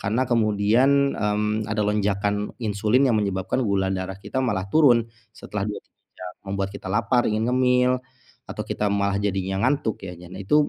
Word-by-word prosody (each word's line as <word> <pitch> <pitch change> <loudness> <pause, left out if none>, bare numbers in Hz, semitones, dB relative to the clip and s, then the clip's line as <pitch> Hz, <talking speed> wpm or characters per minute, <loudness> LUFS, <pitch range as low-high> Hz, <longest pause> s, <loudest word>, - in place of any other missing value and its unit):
Karena 110 +6 0
kemudian, 120 +5 +3
mmm, 105 +1 -1
ada 105 -1 0
lonjakan 105 0 -1
insulin 110 +5 +2
yang 115 - +2
menyebabkan 95 +4 -1
gula 100 -2 +1
darah 95 0 -4
kita 130 +6 -3
malah 105 -7 0
turun 120 -7 +5 0.3
setelah 100 -1 -5
2, 105 - -4
3 - - -44
jam 90 -1 -7 0.2
membuat 100 0 -2
kita 100 - -7
lapar, 115 +4 +2
ingin 110 +2 0
ngemil, 125 0 +3 0.6
atau - - -4
kita 105 - -1
malah 100 -1 +1
jadinya 95 -1 -1
ngantuk 140 -7 -1
ya, 90 - -7
dan 90 0 -12
itu 145 +9 +3
105 Hz, 170 wpm, -24 LUFS, 100-120 Hz, 0.6 s, turun